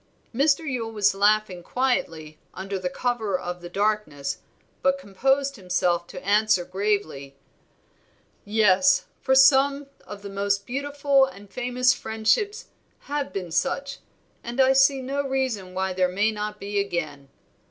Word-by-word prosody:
Mr. 285 Hz, +5 st, +2 dB
Yule 235 Hz, -4 st, -3 dB
was 210 Hz, -3 st, +2 dB
laughing 205 Hz, -2 st, +2 dB
quietly 170 Hz, -, -2 dB, 0.2 s
under 195 Hz, +1 st, -4 dB
cover 220 Hz, -4 st, -1 dB
of 180 Hz, 0 st, -6 dB
the 175 Hz, -, -8 dB
darkness, 195 Hz, -8 st, -1 dB, 0.4 s
but 275 Hz, +1 st, +2 dB
composed 270 Hz, +4 st, 0 dB
himself 180 Hz, -2 st, 0 dB
to 180 Hz, -, -10 dB
answer 205 Hz, -2 st, +3 dB
gravely 185 Hz, -8 st, -2 dB, 1.1 s
"Yes, 185 Hz, -3 st, +3 dB, 0.2 s
for 265 Hz, -, +2 dB
some 275 Hz, +1 st, +5 dB, 0.2 s
of 205 Hz, -1 st, -9 dB
the 200 Hz, -, -6 dB
most 200 Hz, 0 st, -1 dB
beautiful 280 Hz, +1 st, +1 dB
and 205 Hz, -6 st, -12 dB
famous 250 Hz, 0 st, +1 dB
friendships 325 Hz, -, -1 dB, 0.3 s
have 285 Hz, -1 st, -4 dB
been 180 Hz, -4 st, -5 dB
such, 275 Hz, +11 st, -1 dB, 0.4 s
and 240 Hz, +2 st, -6 dB
I 265 Hz, 0 st, +5 dB
see 270 Hz, 0 st, +4 dB
no 275 Hz, +2 st, -2 dB
reason 245 Hz, -9 st, -2 dB
why 190 Hz, 0 st, -1 dB
there 185 Hz, 0 st, +1 dB
may 205 Hz, +4 st, +1 dB
not 210 Hz, 0 st, -5 dB
be 200 Hz, +1 st, -2 dB
again. 155 Hz, -8 st, -4 dB
210 Hz, 135 wpm, -24 LUFS, 185-265 Hz, 1.1 s, some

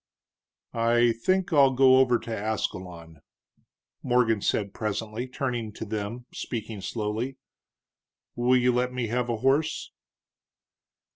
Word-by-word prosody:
"I 120 Hz, +1 st, +3 dB
think 180 Hz, +11 st, 0 dB
I'll 140 Hz, -3 st, +5 dB
go 130 Hz, 0 st, +6 dB
over 125 Hz, -2 st, +4 dB
to 115 Hz, -1 st, -5 dB
Ascalon," 90 Hz, -7 st, -4 dB, 0.8 s
Morgan 120 Hz, -4 st, +2 dB
said 100 Hz, -1 st, -1 dB
presently, 110 Hz, +3 st, -3 dB
turning 125 Hz, -4 st, -3 dB
to 110 Hz, -, -6 dB
them, 110 Hz, +3 st, -4 dB
speaking 110 Hz, -4 st, -5 dB
slowly. 110 Hz, +6 st, -3 dB, 1.0 s
"Will 125 Hz, +1 st, +3 dB
you 125 Hz, 0 st, +3 dB
let 125 Hz, +1 st, 0 dB
me 125 Hz, -3 st, -3 dB
have 120 Hz, +1 st, -1 dB
a 115 Hz, -, 0 dB
horse?" 140 Hz, +6 st, 0 dB
120 Hz, 120 wpm, -26 LUFS, 110-125 Hz, 1.0 s, go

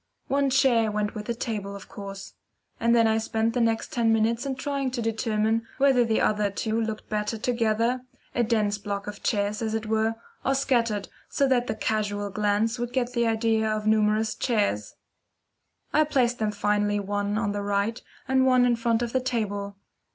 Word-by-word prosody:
One 275 Hz, 0 st, +2 dB
chair 255 Hz, -5 st, +3 dB
went 210 Hz, 0 st, -1 dB
with 210 Hz, -1 st, -6 dB
the 235 Hz, -, -1 dB
table, 210 Hz, -4 st, -4 dB
of 200 Hz, -, -10 dB
course; 195 Hz, -1 st, -8 dB, 0.5 s
and 235 Hz, +1 st, +3 dB
then 230 Hz, -1 st, +5 dB
I 220 Hz, 0 st, +3 dB
spent 225 Hz, 0 st, 0 dB
the 245 Hz, -, +1 dB
next 225 Hz, -1 st, 0 dB
ten 230 Hz, -2 st, +2 dB
minutes 225 Hz, +3 st, +1 dB
in 270 Hz, -, -2 dB
trying 275 Hz, 0 st, -2 dB
to 250 Hz, -1 st, -4 dB
determine 225 Hz, 0 st, 0 dB
whether 270 Hz, -3 st, +4 dB
the 225 Hz, -1 st, +1 dB
other 210 Hz, -1 st, +2 dB
two 220 Hz, +3 st, -1 dB
looked 220 Hz, -1 st, -4 dB
better 210 Hz, +1 st, -2 dB
together 230 Hz, +1 st, 0 dB, 0.3 s
a 245 Hz, -, +1 dB
dense 210 Hz, -3 st, +1 dB
block 200 Hz, 0 st, -4 dB
of 205 Hz, -1 st, -7 dB
chairs, 205 Hz, 0 st, 0 dB
as 220 Hz, -1 st, -1 dB
it 220 Hz, 0 st, -2 dB
were 220 Hz, +1 st, +1 dB, 0.3 s
or 270 Hz, -, +1 dB
scattered 235 Hz, -6 st, +1 dB, 0.2 s
so 280 Hz, -, +2 dB
that 245 Hz, -2 st, +2 dB
the -, -, -2 dB
casual 205 Hz, -2 st, -1 dB
glance 210 Hz, +4 st, 0 dB
would 240 Hz, 0 st, -3 dB
get 250 Hz, -1 st, -1 dB
the 235 Hz, -1 st, +1 dB
idea 225 Hz, -1 st, +1 dB
of 215 Hz, 0 st, -2 dB
numerous 215 Hz, 0 st, +2 dB
chairs. 205 Hz, -, -1 dB, 1.0 s
I 310 Hz, -, +5 dB
placed 250 Hz, -5 st, +1 dB
them 215 Hz, -1 st, 0 dB
finally 205 Hz, 0 st, +1 dB
one 205 Hz, +1 st, -1 dB
on 215 Hz, -2 st, 0 dB
the 205 Hz, 0 st, -3 dB
right, 205 Hz, +3 st, -1 dB, 0.3 s
and 265 Hz, 0 st, +3 dB
one 255 Hz, -1 st, +5 dB
in 240 Hz, -1 st, +2 dB
front 230 Hz, 0 st, +1 dB
of 235 Hz, -, -4 dB
the 260 Hz, -, +2 dB
table. 205 Hz, -5 st, -2 dB
225 Hz, 190 wpm, -26 LUFS, 210-240 Hz, 1.0 s, then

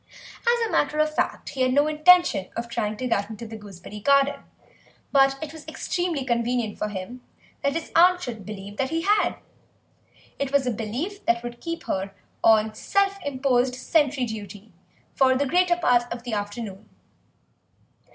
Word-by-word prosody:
As 475 Hz, -1 st, +2 dB
a -, -, -7 dB
matter 295 Hz, +1 st, +1 dB
of 305 Hz, 0 st, +2 dB
fact, -, -, -2 dB
he 265 Hz, -, -4 dB
had 255 Hz, 0 st, +3 dB
no 290 Hz, +1 st, +5 dB
intention 310 Hz, -, +4 dB
of 235 Hz, +1 st, -3 dB
trying 215 Hz, -2 st, -2 dB
to 255 Hz, -, -3 dB
get 205 Hz, -3 st, 0 dB
into 220 Hz, +1 st, -7 dB
the 225 Hz, 0 st, -8 dB
gooseberry 205 Hz, -1 st, -10 dB
garden, 280 Hz, +4 st, +3 dB, 0.7 s
but 270 Hz, -1 st, +4 dB
it 310 Hz, 0 st, -7 dB
was 315 Hz, -1 st, -12 dB
extremely 345 Hz, -7 st, -2 dB
convenient 235 Hz, -2 st, -1 dB
for 210 Hz, -, -1 dB
him 205 Hz, +5 st, -7 dB, 0.4 s
that 280 Hz, -, +1 dB
his 330 Hz, +1 st, -4 dB
aunt 355 Hz, +2 st, +6 dB
should 225 Hz, -4 st, -6 dB
believe 205 Hz, 0 st, -8 dB
that 265 Hz, 0 st, 0 dB
he 330 Hz, 0 st, -1 dB
had; 415 Hz, +2 st, +2 dB, 1.0 s
it 275 Hz, -1 st, -2 dB
was 280 Hz, -2 st, +3 dB
a 250 Hz, -, +1 dB
belief 245 Hz, -, -4 dB
that 235 Hz, 0 st, +2 dB
would 240 Hz, 0 st, -7 dB
keep 335 Hz, 0 st, -5 dB
her 195 Hz, +1 st, -3 dB, 0.3 s
on 220 Hz, -1 st, +4 dB
self 395 Hz, -, 0 dB
imposed 260 Hz, -2 st, +1 dB
sentry 280 Hz, -1 st, +1 dB
duty 210 Hz, -2 st, -8 dB, 0.4 s
for 260 Hz, -1 st, +4 dB
the 285 Hz, -, +1 dB
greater 355 Hz, +4 st, +3 dB
part 245 Hz, -7 st, +2 dB
of 235 Hz, 0 st, -5 dB
the 245 Hz, -2 st, -5 dB
afternoon. 205 Hz, 0 st, -5 dB
255 Hz, 170 wpm, -25 LUFS, 220-305 Hz, 1.0 s, aunt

